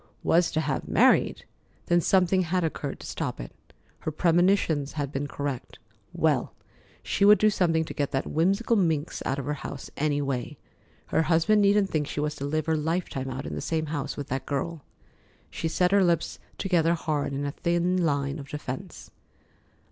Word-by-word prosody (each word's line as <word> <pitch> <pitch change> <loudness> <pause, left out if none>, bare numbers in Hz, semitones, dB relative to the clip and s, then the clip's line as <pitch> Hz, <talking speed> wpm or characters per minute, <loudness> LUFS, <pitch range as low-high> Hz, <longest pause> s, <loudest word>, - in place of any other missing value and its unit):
"Was 170 0 +3
to 155 - +1
have 140 -3 -2
married!" - - +3 0.4
Then 175 0 +3
something 185 +1 +3
had 180 +1 0
occurred 150 -3 -3
to - - -9
stop - - -4
it. - - -7 0.5
Her - - -3
premonitions 165 -2 +2
had 145 -3 -3
been 145 0 -3
correct. 140 -3 -5 0.3
Well, - - 0 0.5
she 200 - 0
would 210 +1 +8
do 215 0 +4
something 165 -4 +1
to - - -7
get 145 -2 -1
that 135 -1 -1
whimsical 195 +9 +1
minx 165 -6 0
out 135 - 0
of 140 - -4
her 150 - -1
house, 140 -1 -7
any 145 -1 0
way. 135 0 -3 0.5
Her - - +2
husband 170 +6 +3
needn't 200 -1 +3
think 150 -2 0
she - - -4
was 150 0 -1
to 140 - -4
live 155 +1 -1
her 160 - +1
lifetime 155 -4 -2
out 130 +1 -5
in - - -5
the - - -4
same 160 -1 -1
house 145 -2 -3
with 145 -1 -5
that 130 0 -3
girl. 150 +2 -3 0.7
She 165 - -3
set 180 +3 +1
her 200 -1 +5
lips 170 -2 0 0.2
together 170 -3 +2
hard 155 -4 -2
in 140 +1 -3
a 140 - -2
thin 175 +3 0
line 140 -1 0
of 140 -1 -9
defence. 140 -3 -7
155 Hz, 185 wpm, -27 LUFS, 145-175 Hz, 0.7 s, would